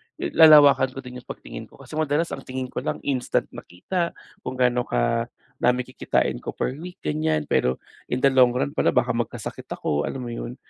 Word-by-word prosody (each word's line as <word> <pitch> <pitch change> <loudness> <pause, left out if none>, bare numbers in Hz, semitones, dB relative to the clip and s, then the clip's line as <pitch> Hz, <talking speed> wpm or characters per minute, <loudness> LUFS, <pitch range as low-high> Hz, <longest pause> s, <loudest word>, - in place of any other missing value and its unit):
lalawakan 145 -5 +6
ko 135 - -6
din 125 0 -8
'yong - - -20
pagtingin - - -8
ko. - - -20
Kasi 155 - -6
madalas 155 +2 0
ang 135 - -6
tingin 130 0 -4
ko - - -3
lang - - -4
instant 130 -3 -1
nakita, 170 - -4 0.2
kung 125 - -6
gaano 125 -1 +1
kadami 120 - -1
kikitain 125 - -1
ko - - -6
per - - -1
week 180 +1 -8
gan'yan. 155 0 -1
Pero 65 +1 +1 0.2
in 125 +2 -2
the 135 - +6
long 125 -2 +5
run 135 +2 0
pala - - +1
baka 125 0 +3
magkasakit 115 -1 -4
ako 75 0 -1
alam 130 -2 -5
mo 120 - -5
'yon, 120 +1 -6
130 Hz, 190 wpm, -24 LUFS, 120-145 Hz, 0.2 s, lalawakan